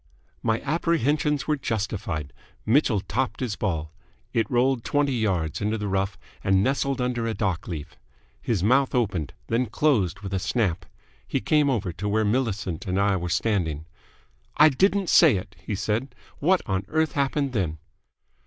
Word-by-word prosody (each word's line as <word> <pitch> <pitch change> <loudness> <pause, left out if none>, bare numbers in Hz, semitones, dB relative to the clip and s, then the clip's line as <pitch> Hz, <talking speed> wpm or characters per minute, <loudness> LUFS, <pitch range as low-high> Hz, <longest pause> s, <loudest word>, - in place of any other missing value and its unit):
My 110 0 0
apprehensions 150 -1 +1
were 150 -1 +1
justified. 105 - -3 0.3
Mitchell 115 -3 +3
topped 125 +6 -2
his 120 -6 -2
ball. 80 -6 -2 0.4
It 115 -3 +1
rolled 125 0 +2
twenty 145 -1 +1
yards 95 -10 -1
into 105 +2 0
the 105 -1 -3
rough, 95 0 -1 0.3
and 95 0 +3
nestled 135 +1 0
under 125 -2 -1
a 110 - -2
dock 95 -4 -1
leaf. 80 -5 -6 0.4
His 105 -7 -1
mouth 130 +5 +3
opened, 95 - 0
then 120 +2 0
closed 105 - +1
with 100 -1 -6
a 95 - +1
snap. 90 -3 -1 0.4
He - - 0
came 150 +6 +2
over 105 -9 -1
to 105 +4 -3
where 110 +1 +2
Millicent 105 -7 -1
and 95 +1 0
I 100 0 +3
were 90 -1 -3
standing. 85 -5 0 0.7
"I 155 +1 +8
didn't 195 +6 +2
say 155 -9 +7
it!" 95 +1 -6
he 105 - -3
said. 110 +6 -2 0.2
"What 180 +5 +3
on 95 -1 -1
earth 160 +5 +1
happened 140 -1 0
then?" 90 -8 -1
110 Hz, 165 wpm, -25 LUFS, 95-135 Hz, 0.7 s, I